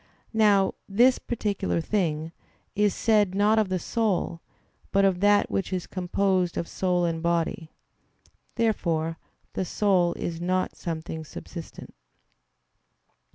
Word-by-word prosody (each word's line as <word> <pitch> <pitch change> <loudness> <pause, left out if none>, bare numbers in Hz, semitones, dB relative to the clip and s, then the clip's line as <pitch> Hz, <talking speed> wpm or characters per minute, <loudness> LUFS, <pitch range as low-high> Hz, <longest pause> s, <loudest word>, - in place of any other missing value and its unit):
Now 205 -3 +4 0.2
"this 245 +6 +4
particular 205 -6 -2
thing" 160 -3 -1 0.4
is 210 -1 +2
said 210 -4 +2
not 210 +2 +4
of 210 -3 +1
the 185 - 0
soul, 185 -4 -1 0.5
but 195 0 +4
of 190 -2 +2
that 205 +1 +3
which 195 - -1
is 185 -2 -2
composed 185 -1 0
of 170 - -2
soul 180 -2 0
and 165 -1 -2
body. 170 +1 -1 0.9
Therefore 165 -8 0 0.3
the - - -1
soul 185 -2 +2
is 170 -1 -5
not 185 +1 0
something 160 -1 -5
subsistent. 165 +2 -9
185 Hz, 120 wpm, -26 LUFS, 170-205 Hz, 0.9 s, Now